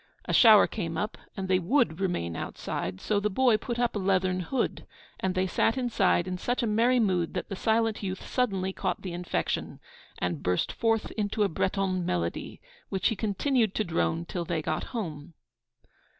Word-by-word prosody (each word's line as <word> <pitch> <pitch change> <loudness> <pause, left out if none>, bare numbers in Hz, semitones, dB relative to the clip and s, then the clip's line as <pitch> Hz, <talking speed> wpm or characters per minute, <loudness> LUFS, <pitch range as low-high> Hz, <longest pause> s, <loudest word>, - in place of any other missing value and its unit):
A - - -2
shower 220 -4 +8
came 165 -7 -4
up, 210 - -2 0.2
and 190 -1 -3
they 185 -1 +3
would 185 - +1
remain 85 - -1
outside; 90 +3 -4
so 210 -1 0
the 210 +1 0
boy 245 +3 +4
put 240 +2 -4
up 240 -1 0
a - - 0
leathern 185 -1 +1
hood, 245 +9 -2 0.3
and 190 0 -1
they 185 0 +2
sat 225 +6 +1
inside 240 -8 +2
in 180 0 -3
such 245 +5 -1
a - - +2
merry 230 +4 +3
mood 185 -6 +1
that - - -3
the 195 - -3
silent 225 +2 +1
youth 190 -2 -4
suddenly 195 -7 0
caught - - -2
the 185 -3 -4
infection, 175 0 -2 0.4
and 85 -5 -2
burst 90 0 0
forth 225 -1 0
into 210 0 -1
a 200 - +2
Breton 185 +1 0
melody, 85 - -2 0.3
which 190 -2 +1
he 225 - -1
continued 220 +1 +1
to 215 - +1
drone 170 -2 -1
till 175 0 -3
they 170 -2 -2
got - - -2
home. 165 - -6
190 Hz, 185 wpm, -28 LUFS, 175-225 Hz, 0.4 s, shower